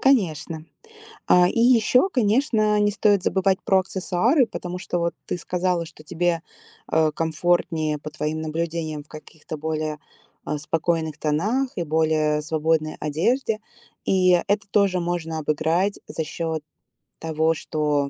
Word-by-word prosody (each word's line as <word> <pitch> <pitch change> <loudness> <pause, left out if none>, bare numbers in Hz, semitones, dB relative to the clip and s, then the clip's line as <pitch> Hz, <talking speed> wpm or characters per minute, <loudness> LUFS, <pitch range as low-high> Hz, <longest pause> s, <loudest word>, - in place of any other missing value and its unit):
Конечно. 165 - +1 0.6
А, 180 0 +6
и 230 - -1
еще, 245 - +5
конечно, 220 - +2
не 205 0 +3
стоит 205 -2 +2
забывать 190 0 +2
про 190 - +4
аксессуары, 195 - +1
потому 180 -5 -6
что 180 -1 -3
вот 170 0 0
ты - - -3
сказала, 180 0 -1
что 155 -1 -14
тебе, 170 +1 0 0.5
а, 160 -1 +2
комфортнее, 160 -1 0
по 150 +1 -8
твоим 155 +1 -3
наблюдениям, 160 -1 -3
в - - -30
каких-то 155 0 -9
более, 155 0 -2 0.5
а, 150 - -2
спокойных 160 0 -1
тонах 210 - 0
и 175 - -1
более 155 -1 +1
свободной 155 0 0
одежде. 215 - 0 0.5
И 185 -1 +4 0.2
это 205 +1 0
тоже 195 -2 +2
можно 170 -2 -2
обыграть 160 +6 0
за 160 - -3
счет 160 0 -3 0.6
того, 160 0 +1
что, 150 -3 -1
165 Hz, 135 wpm, -23 LUFS, 155-195 Hz, 0.6 s, А